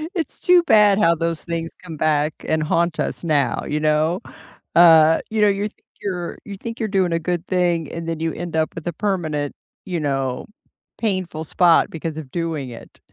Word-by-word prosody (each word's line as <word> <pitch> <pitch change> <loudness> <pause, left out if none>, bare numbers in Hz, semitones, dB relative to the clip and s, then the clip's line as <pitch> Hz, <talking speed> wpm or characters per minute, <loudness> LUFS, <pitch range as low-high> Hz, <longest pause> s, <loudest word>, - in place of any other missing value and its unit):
It's 330 - -3
too 360 -1 +5
bad 210 - +5
how 170 -5 +4
those 165 -1 -2
things 165 -1 -3
come 165 -3 -8
back 150 0 +1
and 155 0 +1
haunt 165 +1 0
us - - -2
now, 145 -7 +1
you 150 - -1
know? 155 +4 +1 0.5
Uh, 160 -2 +7
you 220 -1 -1
know, 210 - +6
you're 200 +1 0
think - - -19 0.2
you're 180 -3 -4
you 200 - -7
think 230 +3 -7
you're 220 -2 -1
doing 190 -3 +1
a 165 - +1
good 175 +1 -2
thing, 175 -4 0
and 165 0 -6
then 165 - -3
you 165 0 -1
end 175 -2 -6
up 160 0 0
with 165 +1 -7
a 170 - -1
permanent, 155 -8 -2 0.3
you 180 -3 -2
know, 135 -3 -2 0.5
painful 185 -7 -2
spot 170 +1 +4
because 160 -1 -5
of 140 -5 -8
doing 165 -6 -3
it. 120 - -12
165 Hz, 195 wpm, -21 LUFS, 155-185 Hz, 0.5 s, Uh